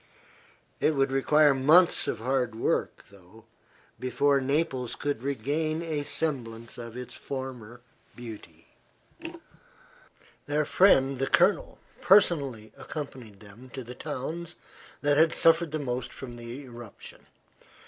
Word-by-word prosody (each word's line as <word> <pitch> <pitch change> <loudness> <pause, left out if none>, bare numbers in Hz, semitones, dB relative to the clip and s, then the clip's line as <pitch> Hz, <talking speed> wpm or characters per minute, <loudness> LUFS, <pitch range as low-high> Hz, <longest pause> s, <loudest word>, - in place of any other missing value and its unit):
It 155 - +2
would 135 -1 +1
require 145 +2 +4
months 155 +7 +4
of - - -1
hard 125 0 -1
work, 115 - -1
though, 100 +3 -18 0.5
before 140 +2 +2
Naples 135 -3 -1
could 145 -5 -3
regain 145 +5 -2
a 155 -3 -2
semblance 120 -7 -3
of 115 0 -8
its 125 - -7
former 125 -4 -7 0.3
beauty. 115 -3 -11 1.8
Their 150 +1 +1
friend 135 -9 +4
the 135 - 0
Colonel - - +2 0.2
personally 140 - +3
accompanied 125 -9 -8
them 110 +5 -14
to 130 - -5
the 120 +1 -9
towns 155 +5 -6 0.5
that 145 -1 +2
had 160 +1 +5
suffered 165 -1 +3
the 155 - -1
most 125 -4 -3
from 125 -3 -9
the 120 +4 -8
eruption. 120 -4 -11
135 Hz, 120 wpm, -28 LUFS, 120-150 Hz, 1.8 s, had